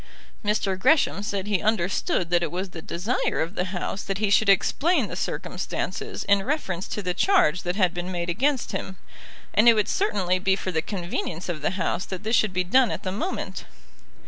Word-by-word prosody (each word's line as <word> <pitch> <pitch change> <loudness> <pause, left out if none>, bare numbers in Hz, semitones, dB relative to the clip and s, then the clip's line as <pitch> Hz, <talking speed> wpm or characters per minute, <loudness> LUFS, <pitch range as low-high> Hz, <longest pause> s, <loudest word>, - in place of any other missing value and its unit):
Mr. 205 -2 0
Gresham 285 -4 +3
said 200 -2 -3
he 205 -2 0
understood 190 -4 0
that 175 -1 +4
it 170 - -2
was 185 +2 -4
the 165 - -8
desire 185 +10 -1
of 165 +3 -1
the 180 - -1
House 190 +1 -3
that 195 -1 -3
he 210 -1 0
should 210 0 +4
explain 295 - +3
the - - -6
circumstances - - -4
in 200 -1 +3
reference 195 - -2
to 210 - -4
the 180 -1 -1
charge 180 - +3
that 175 0 -2
had 185 -4 +2
been 175 +1 -4
made 175 -1 -3
against 255 +9 0
him, 190 -1 -5 0.6
and 215 +4 +6
it 230 - +6
would 210 -1 +1
certainly 190 - +1
be 190 +1 +2
for 190 -1 -4
the 160 -2 0
convenience 175 -2 -4
of 160 -4 -3
the 180 +6 -1
House 170 0 -1
that 190 +1 -6
this 220 +2 +1
should 210 -1 +3
be 185 0 0
done 245 +7 +4
at - - -4
the 185 - -2
moment. 320 - -4
190 Hz, 205 wpm, -25 LUFS, 180-215 Hz, 0.6 s, and